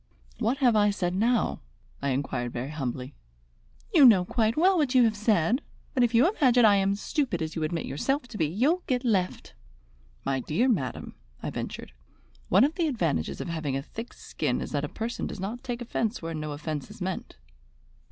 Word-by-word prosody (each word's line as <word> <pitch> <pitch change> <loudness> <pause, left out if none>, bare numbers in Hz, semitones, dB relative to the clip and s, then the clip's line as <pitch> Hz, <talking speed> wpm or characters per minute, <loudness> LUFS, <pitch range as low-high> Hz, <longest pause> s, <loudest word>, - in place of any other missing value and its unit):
"What 240 +3 +1
have 245 -5 +3
I 210 -1 +4
said 180 -3 -1
now?" 225 +4 +1 0.4
I 140 - 0
inquired 130 -2 -2
very 125 +4 -4
humbly. 130 -2 -4 0.8
"You 310 - +7
know 205 -8 +7
quite 225 +4 0
well 375 +4 +5
what 290 -6 +1
you 250 - +7
have 220 -2 +2
said. 215 - +2 0.3
But 255 - +1
if 240 -1 +1
you 245 +8 +6
imagine 255 - +4
I 205 -2 +6
am 195 0 +2
as 200 - -5
stupid 255 - -1
as 160 -1 -4
you 160 - -2
admit 155 +1 -2
yourself 270 - -1
to 220 - -7
be, 155 - +2
you'll 265 - +1
get 250 -1 0
left!" 190 -6 0 0.7
"My 135 -1 0
dear 160 - 0
madam," 155 - -1 0.3
I - - -3
ventured; - - -6 0.6
"one 195 +6 +6
of 290 +3 +2
the 335 -1 0
advantages 160 - -1
of - - -5
having 155 -5 -2
a 135 - -4
thick 225 - -8
skin - - -2
is - - -5
that - - -1
a - - -3
person 230 +2 -4
does - - -7
not 215 +7 -5
take 245 -2 -4
offence 230 0 -2
where 165 0 -5
no 155 -1 -4
offence 150 -1 -5
is - - -12
meant." 185 - -4
210 Hz, 200 wpm, -27 LUFS, 155-245 Hz, 0.8 s, You